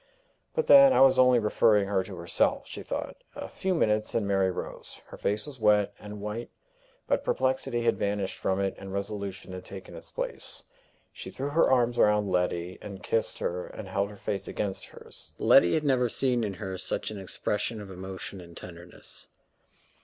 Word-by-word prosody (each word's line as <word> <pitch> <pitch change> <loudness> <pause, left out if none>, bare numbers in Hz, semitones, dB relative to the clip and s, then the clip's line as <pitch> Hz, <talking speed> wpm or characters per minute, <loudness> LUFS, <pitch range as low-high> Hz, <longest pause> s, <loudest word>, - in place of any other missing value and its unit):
"But, 475 -1 +1
then, 275 -1 +9
I - - +5
was 135 -1 +6
only 125 -1 +6
referring 105 -2 +3
her 95 -2 +1
to 95 -1 -8
herself!" 85 -1 +1
she - - -7
thought. - - -4 0.2
A - - -5
few 190 -1 -1
minutes, 105 -8 +1
and 110 -3 +1
Mary 95 -1 +2
rose. 90 - -6
Her - - -11
face 105 +1 -1
was 145 -4 -10
wet 105 -2 +3
and 105 0 -8
white, 105 +3 -5 0.6
but - - +1
perplexity 130 -2 0
had 115 - +2
vanished 100 -1 -1
from 95 0 0
it, 95 -1 0
and 95 0 -8
resolution 100 -1 -4
had 90 0 -7
taken 95 0 -9
its - - -10
place. - - -2 0.5
She - - -8
threw 140 +2 -4
her 160 +3 +3
arms 120 -2 +3
round 105 -2 +4
Letty, 90 0 -1
and 100 -1 -8
kissed 115 - -1
her, 90 +1 -3
and - - -8
held 100 +1 -1
her 105 - -11
face 100 0 -3
against 100 -2 -3
hers. - - -10
Letty 85 - +6
had 155 - +1
never 130 -4 +2
seen 125 -1 +1
in 100 -3 -2
her 95 -3 -5
such - - -1
an 105 - -6
expression 105 +4 -2
of 100 -2 -9
emotion 95 +1 -7
and 85 -1 -12
tenderness. 85 0 -10
105 Hz, 190 wpm, -28 LUFS, 95-120 Hz, 0.6 s, then